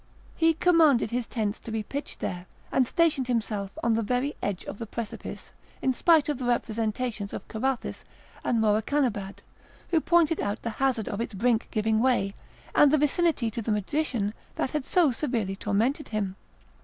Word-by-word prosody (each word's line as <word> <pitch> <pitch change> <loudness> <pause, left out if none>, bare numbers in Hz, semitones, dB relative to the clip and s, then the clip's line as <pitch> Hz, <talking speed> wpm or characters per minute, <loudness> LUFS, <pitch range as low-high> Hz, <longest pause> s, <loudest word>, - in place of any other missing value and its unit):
He 325 0 +3
commanded 320 -10 +4
his 245 -1 -1
tents 215 -3 -2
to 230 - -8
be 220 -1 -1
pitched 280 +7 -6
there, 180 0 -4 0.2
and 255 -2 +3
stationed 305 -6 +2
himself 215 -5 -2
on 235 - +3
the 225 - +1
very 250 +6 -1
edge 200 -3 -2
of - - -7
the 230 - -5
precipice, 225 0 -6 0.3
in 260 - +1
spite 320 +2 +4
of 295 -3 -1
the 255 - -3
representations 225 -2 -1
of - - -6
Carathis 250 +3 -2 0.4
and 235 - +1
Morakanabad, 215 -1 0 0.5
who 325 -2 +3
pointed 335 -1 +3
out 205 +2 -2
the 230 - -2
hazard 260 -5 +1
of 205 - -3
its 230 -2 -4
brink 230 +2 +1
giving 220 0 +1
way, 235 -5 +2 0.4
and 295 - +6
the 310 - +5
vicinity 295 -4 +1
to 230 - -4
the 220 - -2
magician 210 0 -1 0.2
that - - -1
had 300 -3 -2
so 340 -6 +4
severely 230 -7 -1
tormented 225 +9 0
him. 200 -3 -2
235 Hz, 175 wpm, -27 LUFS, 215-280 Hz, 0.5 s, and